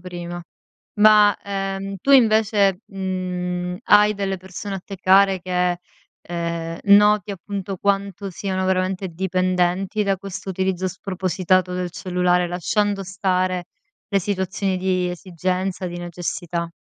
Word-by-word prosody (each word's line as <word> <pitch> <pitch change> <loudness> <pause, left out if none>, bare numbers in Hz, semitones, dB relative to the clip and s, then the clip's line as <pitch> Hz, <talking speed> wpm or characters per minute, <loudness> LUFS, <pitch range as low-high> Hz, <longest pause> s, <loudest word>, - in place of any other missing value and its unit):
prima. 175 -1 -7 0.6
Ma, 210 -1 +7
ehm, 195 0 -3
tu 275 - -1
invece, 215 -5 +4
mhmm, 180 -2 -3
hai 210 0 +5
delle 195 -1 -2
persone 190 +2 -6
a - - -7
te 195 - -8
care 190 0 +4
che, 180 -1 0 0.5
ehm, 170 -1 -4
noti 205 0 +5
appunto 195 0 -5
quanto 200 0 -1
siano 190 +1 -3
veramente 185 0 0
dipendenti 185 +3 0
da 195 -1 +1
questo 195 0 -8
utilizzo 190 0 -1
spropositato 185 0 0
del 180 -1 -3
cellulare? 180 -1 +1
Lasciando 200 +3 0
stare 185 -1 -1 0.4
le 200 - +2
situazioni 190 0 -1
di 185 -1 0
esigenza, 185 +1 -3
di 175 0 -5
necessità. 170 -1 -4
185 Hz, 120 wpm, -22 LUFS, 180-195 Hz, 0.6 s, Ma